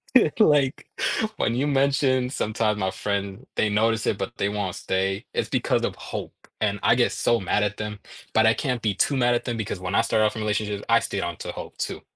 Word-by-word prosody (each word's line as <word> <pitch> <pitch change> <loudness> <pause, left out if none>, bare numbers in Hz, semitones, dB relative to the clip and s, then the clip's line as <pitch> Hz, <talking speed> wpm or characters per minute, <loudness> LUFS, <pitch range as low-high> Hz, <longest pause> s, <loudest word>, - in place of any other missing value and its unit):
It's 235 - +4
like, 145 -8 +3 0.5
when 115 - +1
you 135 +4 +1
mentioned 135 -2 +2
sometimes 110 -2 0
my 95 0 0
friend 100 -1 -3
they 110 - +2
notice 110 +2 +1
it, 100 - +1
but 105 +5 -4
they 100 - +1
won't 100 -3 -2
stay, 95 +1 -1
it's - - -1
because - - +1
of - - -1
hope, - - -6 0.3
and 105 -2 +1
I - - +5
get 125 - +3
so 120 - +1
mad 100 +2 +1
at 105 0 -1
them, 105 -1 -5 0.3
but 110 0 +4
I 110 - +6
can't 125 -4 -2
be 105 -3 +1
too 140 +8 +1
mad 120 -1 +3
at 120 - 0
them 120 -2 -2
because 100 -3 -3
when 90 +2 -3
I - - +5
started 110 -1 +2
off 105 - 0
in 110 - -4
relationships, 105 -1 -1
I 115 0 +5
stayed - - -3
onto - - -4
hope - - -9
too. - - -3
110 Hz, 225 wpm, -25 LUFS, 100-120 Hz, 0.5 s, I